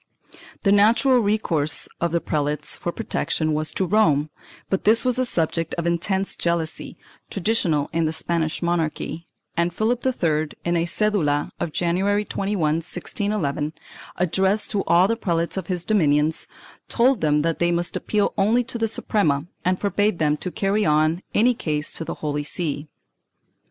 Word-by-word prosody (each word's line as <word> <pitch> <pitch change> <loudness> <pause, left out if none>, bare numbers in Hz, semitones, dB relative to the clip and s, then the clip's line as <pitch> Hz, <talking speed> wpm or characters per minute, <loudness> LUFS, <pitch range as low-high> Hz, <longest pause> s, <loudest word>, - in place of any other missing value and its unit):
The 195 - +3
natural 230 +6 +5
recourse 200 -9 +1
of 170 -1 0
the 170 - +1
prelates 150 -2 -1
for 175 - -4
protection 155 -2 -1
was 155 +1 -1
to 190 - 0
Rome, 155 -7 +2 0.4
but 190 - -1
this 225 +4 +4
was 255 0 +1
a 255 - +2
subject 165 -5 -1
of 170 - -3
intense 190 +3 0
jealousy, 170 -2 -2 0.3
traditional 180 -7 +1
in 165 0 +1
the 155 - 0
Spanish 160 0 -1
monarchy, 165 -1 -2 0.3
and 170 +1 +1
Philip 225 +7 -1
III, 160 -12 +1 0.2
in 175 0 +1
a 170 0 +1
cedula 160 -6 +1
of 165 - -2
January 195 +6 +1
21, 200 +1 -2
1611, 160 0 -1 0.4
addressed 190 +4 +1
to 205 -2 0
all 175 +3 +5
the 230 - +1
prelates 170 -6 -1
of 190 -4 -4
his 180 -2 -2
dominions, 155 -6 +2 0.4
told 250 -1 +3
them 150 -1 +2
that 165 0 -1
they 175 0 +2
must 175 0 +1
appeal 210 -1 0
only 225 +5 +3
to 235 0 -5
the 225 - +1
Suprema 160 -9 0 0.2
and 185 0 +1
forbade 205 0 +1
them 150 -2 +2
to 180 - -4
carry 200 +3 0
any 165 +9 +2
case 155 -8 -2
to - - -3
the - - -5
Holy 145 0 -1
See. 150 -1 -3
170 Hz, 160 wpm, -23 LUFS, 155-205 Hz, 0.4 s, natural